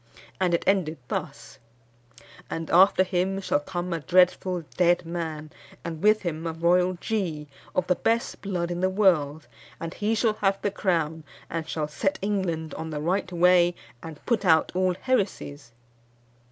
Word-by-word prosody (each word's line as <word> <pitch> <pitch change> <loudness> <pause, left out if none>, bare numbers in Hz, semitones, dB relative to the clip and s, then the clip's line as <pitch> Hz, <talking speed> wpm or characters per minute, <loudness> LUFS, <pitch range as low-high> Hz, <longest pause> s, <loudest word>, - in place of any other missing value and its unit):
And 180 -2 +2
it - - -2
ended 180 -5 +1
thus: 140 -1 -5 0.9
"And 165 0 -4
after 185 +2 +6
him 190 +1 -1
shall 185 - 0
come 175 +3 -4
a 165 - -2
dreadful 180 +3 +2
dead 175 -1 +3
man, 160 -3 -5 0.3
and 165 -2 -5
with 215 +1 +4
him 165 -1 -3
a 165 - -3
royal 180 +3 +2
G, 175 -6 -3 0.3
of 185 - +1
the 180 - +3
best 230 +5 -1
blood 175 -3 -2
in 175 - -3
the 185 +1 +2
world; 160 - +2 0.3
and 165 0 -5
he 215 +2 0
shall 220 0 +2
have 195 -1 +2
the 205 - +1
crown, 165 -5 -1 0.3
and 165 -1 -4
shall 155 -2 -2
set 190 +6 -1
England 185 -6 -2
on 160 0 -5
the 150 -1 -4
right 185 +4 -1
way, 175 0 +4 0.3
and 160 -2 -10
put 230 -4 +1
out 160 -4 +4
all 185 0 +1
heresies." 190 - -2
175 Hz, 165 wpm, -26 LUFS, 160-190 Hz, 0.9 s, after